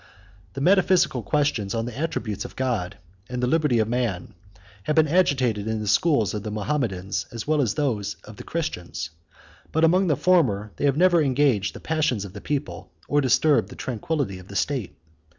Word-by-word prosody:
The 135 - -5
metaphysical 180 -5 +3
questions 120 -5 0
on 115 0 -1
the 120 -2 -6
attributes 130 - -3
of - - -9
God, 115 -8 -2 0.3
and 125 0 -4
the 125 - +1
liberty 150 -2 +2
of 110 -1 +2
man, 115 -7 -2 0.5
have 150 - 0
been 160 -1 +5
agitated 130 - +1
in 110 0 -1
the 105 - -4
schools 110 - +2
of 105 - -3
the 105 - -5
Mahometans, 105 -4 -2
as 115 -2 -6
well 155 -1 +2
as 115 -7 +1
in 150 - -1
those 105 -7 -1
of 105 -1 -12
the - - -8
Christians; 90 - -4 0.6
but 160 - +1
among 180 +4 +4
the 150 - +3
former 110 - +2
they - - -1
have 140 0 +2
never 175 -1 +5
engaged 135 -7 +1
the - - -7
passions 150 -10 0
of 95 - -10
the 105 - -9
people, 145 -1 -4 0.2
or 145 0 +2
disturbed 140 +3 +3
the - - -10
tranquillity 130 - -3
of 90 - -14
the 100 - -10
state. 130 -3 -1
125 Hz, 195 wpm, -24 LUFS, 105-150 Hz, 0.6 s, been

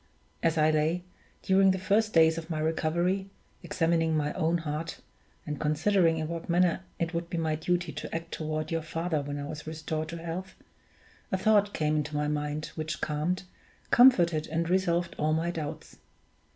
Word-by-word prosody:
As 165 0 +1
I 155 0 +4
lay, 155 +3 +1 0.4
during 190 0 +5
the 190 - +2
first 210 +4 +1
days 160 -1 +5
of 165 +1 -10
my 160 - -2
recovery, 170 +5 0 0.3
examining 165 -2 +1
my 150 -1 -1
own 165 +2 +1
heart, 155 0 -4 0.5
and 150 -2 -4
considering 165 +2 +2
in 155 -1 -2
what 170 +1 -6
manner 175 +1 +3 0.2
it 170 0 -2
would 170 0 -3
be 170 - -3
my 160 -1 0
duty 175 +2 -1
to - - -6
act 165 0 -5
toward 155 0 -3
your 165 0 0
father 165 0 -2
when 145 0 -5
I 145 - -4
was 150 +1 -7
restored 155 0 -3
to 170 - -5
health, 170 +3 -6 0.8
a 190 - +2
thought 205 +1 +3
came 155 -1 +1
into 150 0 -2
my 150 0 0
mind 150 +1 -2
which 155 0 -4
calmed, 155 +5 -1 0.5
comforted, 175 -11 +5
and 165 +2 -1
resolved 175 -2 +1
all 155 +1 +2
my 165 +2 0
doubts. 155 -4 -6
165 Hz, 180 wpm, -29 LUFS, 155-175 Hz, 0.8 s, during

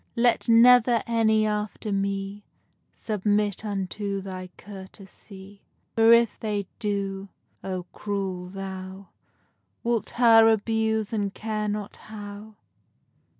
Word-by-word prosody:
Let 235 0 +2
never 240 0 +6
any 220 -2 +2
after 210 0 -3
me 195 +1 -2 0.5
Submit 210 -1 -1
unto 200 0 -3
thy 185 -1 -7
courtesy! 195 0 -12 0.3
For, 225 0 +5
if 235 -1 +5
hey 210 -2 -2
do, 200 -2 -3 0.3
O! 185 -1 -4
cruel 195 -3 -4
thou 190 0 -8 0.7
Wilt 235 -1 0
her 225 -2 +7
abuse 220 0 0
and 205 -2 -1
care 215 0 -3
not 205 -1 -4
how! 210 0 -10
205 Hz, 105 wpm, -25 LUFS, 195-220 Hz, 0.7 s, her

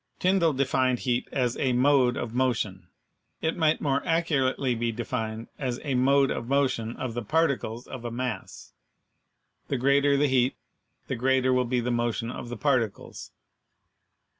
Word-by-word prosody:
Tyndall 180 -4 +2
defined 130 -1 +1
heat 125 -1 0
as 125 -3 0
"a 130 -2 +1
mode 130 -1 +3
of 115 -1 -4
motion." 110 -8 -1 0.5
It 160 - -1
might 160 -2 +2
more 140 -2 0
accurately 140 -6 +1
be 115 0 -1
defined 115 -1 -4
as 125 -3 -2
"a 140 -3 -2
mode 135 +2 +3
of 115 - -4
motion 130 -4 0
of 125 -3 -4
the 120 - -3
particles 125 -3 0
of 125 - -8
a 120 - -3
mass 125 0 -5 0.5
;" - - -49
the 135 - -1
greater 140 +2 +3
the 145 - +3
heat, 130 -1 +2 0.5
the - - -3
greater 130 +1 +2
will 125 0 +2
be 125 0 0
the 125 +1 -2
motion 120 -1 -1
of 120 - -7
the 120 - -5
particles. 125 -6 -1
130 Hz, 165 wpm, -27 LUFS, 120-140 Hz, 0.5 s, mode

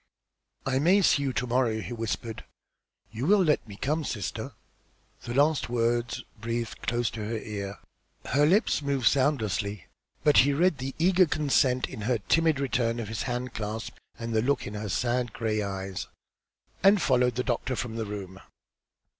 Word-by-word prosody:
"I 135 -1 +1
may 185 +7 +4
see 145 - +4
you 135 -2 -1
to 125 - -1
morrow," 120 -2 +1
he 120 - -5
whispered. 115 0 -4 0.7
"You 120 +6 -3
will 200 0 +5
let 150 - +1
me 100 - -9
come, 150 +9 -1
sister?" 105 -9 -4 0.7
The 120 - -4
last 145 -1 +3
word 120 0 0 0.2
breathed 115 +1 -3
close 120 -1 0
to 110 - -7
her 110 +2 -2
ear. 100 -2 -5 0.5
Her 145 +3 +3
lips 195 -1 +3
moved 140 -3 -1
soundlessly, 110 - +1 0.4
but 150 -2 +5
he 140 +2 +6
read 160 -2 +2
her 130 - -2
eager 180 +2 +4
consent 135 -4 +2
in 125 -5 -8
her 120 +3 +1
timid 160 - +2
return 120 -4 0
of 110 -3 -4
his 110 - -3
hand 125 0 -3
clasp 105 +1 -4 0.2
and 115 -1 -4
the 110 - +3
look 140 +5 0
in 105 - -6
her 105 0 -4
sad, 120 +5 0
grey 110 -2 -1
eyes, 95 -1 -4 0.7
and 195 +1 +6
followed 125 -5 +2
the 125 - 0
doctor 130 +1 -1
from 115 -2 -4
the 115 -1 -2
room. 95 -2 -7
120 Hz, 170 wpm, -27 LUFS, 110-140 Hz, 0.7 s, he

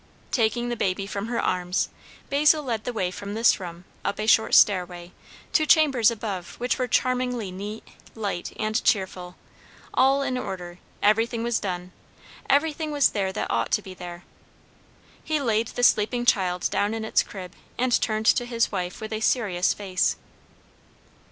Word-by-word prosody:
Taking 240 0 +1
the 240 - -1
baby 195 -2 -1
from 200 +1 -4
her 235 0 -2
arms, 180 0 0 0.4
Basil 300 +2 +4
led 230 -5 -3
the 245 - -1
way 185 -6 -1
from 200 +2 -6
this 225 0 +4
room, 175 -1 -8 0.2
up 200 - -2
a 215 - -1
short 220 0 +4
stairway, 180 -3 +3 0.4
to 310 - +3
chambers 275 -9 +5
above 205 -6 -5
which 245 +1 -1
were 255 - 0
charmingly 250 -4 0
neat, 205 +4 -7 0.3
light, 200 -5 -3
and 215 +2 -1
cheerful, 185 -4 0 0.6
all 270 +1 +3
in 255 -2 -1
order; 180 -5 -6 0.2
everything 225 +2 +2
was 235 -1 0
done, 180 -2 -4 0.6
everything 310 +2 +1
was 290 -2 +3
there 195 -2 -1
that - - -3
ought 115 0 0
to 210 - +2
be 190 - -9
there. 175 -1 -9 1.0
He 310 -1 0
laid 230 -4 +1
the 245 - -4
sleeping 240 +2 +3
child 185 -7 +2
down 205 +2 0
in 220 -1 -4
its - - +3
crib, 185 -3 -9 0.2
and 250 0 +2
turned 215 -1 -1
to 245 - +4
his 235 -1 0
wife 180 +2 -4
with 220 0 -5
a 215 - -2
serious 205 -6 +1
face. 190 -3 0
215 Hz, 165 wpm, -25 LUFS, 185-245 Hz, 1.0 s, chambers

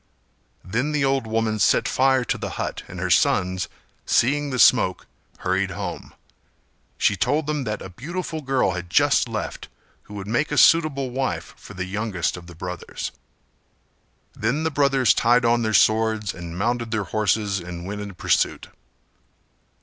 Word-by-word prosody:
Then 125 +11 -1
the 145 -2 +1
old 135 -3 0
woman 110 -1 0
set - - +3
fire 130 -1 +2
to - - -1
the - - -4
hut - - -3
and - - -8
her - - -1
sons, 90 0 +2 0.3
seeing 145 +4 +2
the 130 - -3
smoke 115 -7 +4 0.3
hurried - - 0
home. - - -6 0.8
She 100 - +2
told 145 - 0
them 150 -2 -2
that 105 -1 -3
a 95 - -8
beautiful 160 - -5
girl 135 -7 +1
had 90 -1 -5
just - - +3
left - - -5 0.4
who 105 - -11
would 100 -1 -6
make 120 +9 0
a 150 - -1
suitable 145 -6 +4
wife 130 +1 -3
for 105 - -13
the 90 0 -3
youngest 100 -2 -2
of 90 -1 -11
the 85 - -12
brothers. 90 +1 -6 1.2
Then 125 +9 -1
the 160 - 0
brothers 140 -3 +3
tied 120 +1 +3
on 120 0 +3
their 110 -1 0
swords 110 -1 +2
and 85 -1 -8
mounted 120 +3 -1
their 110 -2 -1
horses 105 +1 0
and 85 0 -7
went 105 +2 -5
in 100 -2 -7
pursuit. - - 0
115 Hz, 165 wpm, -23 LUFS, 95-135 Hz, 1.2 s, smoke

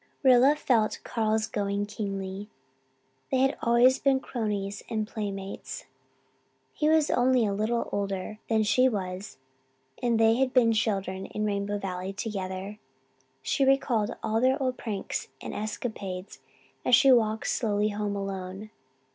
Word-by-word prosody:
Rilla 260 +2 +6
felt 230 -7 +1
Carl's 220 -1 0
going 200 -1 -2
keenly. 195 -1 -5 0.8
They 265 - +1
had 270 +1 +3
always 240 +3 +4
been 270 -1 +3
cronies 205 -6 -3
and 215 -2 -1
playmates. 200 -3 -5 0.9
He 305 -1 +1
was 315 -1 +3
only 250 -1 +3
a 200 - 0
little 220 +4 0
older 200 +1 -3
than 220 -1 +3
she 235 +5 +4
was 190 -2 -5 0.6
and 235 -2 +2
they 225 +1 +5
had 265 0 0
been 230 -3 +5
children 195 -3 -1
in 210 - -3
Rainbow 205 0 -1
Valley 185 -1 -4
together. 195 -1 -5 0.6
She 275 - +1
recalled 265 -5 +2
all 220 +1 0
their 260 +1 +3
old 255 -2 0
pranks 210 -6 -4
and - - -6
escapades 205 -3 -5 0.4
as 250 - +6
she 270 +3 +6
walked 220 -3 +3
slowly 210 -3 +1
home 205 -1 -2
alone. 195 +1 -5
215 Hz, 140 wpm, -28 LUFS, 200-240 Hz, 0.9 s, Rilla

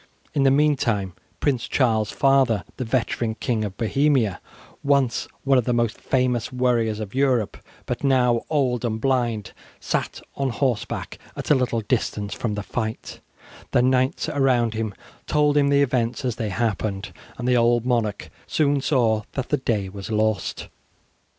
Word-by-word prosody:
In 140 - +1
the 135 - +5
meantime 130 - +2 0.3
Prince 130 -5 0
Charles's 110 -5 +1
father, 135 -7 +3
the 130 - -2
veteran 115 -1 -1
King 115 -1 -1
of 100 -2 -5
Bohemia, 125 - +1 0.4
once 140 -4 +2 0.2
one 135 -1 +4
of 120 - -2
the 125 - +1
most 115 -1 +1
famous 125 -3 0
warriors 120 -4 +1
of 105 -2 -6
Europe, 130 -5 +1 0.3
but 125 - -4
now 125 -4 +3
old 130 -6 +1
and 110 -2 -1
blind, 120 -5 0 0.3
sat - - -2
on 135 -1 -1
horseback 120 -2 -2 0.2
at - - -3
a - - +7
little 125 -3 0
distance 105 -2 -1
from 110 -3 -3
the 105 - -4
fight; 110 +2 -4 0.5
the 125 - +4
knights 130 +1 +1
around 125 -5 +2
him 110 -3 -3 0.3
told 150 -1 +2
him 140 -1 +4
the 140 0 +4
events 125 -1 -1
as 125 -3 -1
they 110 -3 -2
happened, 105 -1 -2 0.2
and 125 - -3
the 125 - +4
old 120 0 +3
monarch 115 -5 -1 0.2
soon 145 -2 +1
saw 120 -7 +2
that 135 -2 -3
the 150 - +2
day 110 -7 -1
was 100 +1 -8
lost. 110 -1 -1
120 Hz, 160 wpm, -23 LUFS, 110-135 Hz, 0.5 s, a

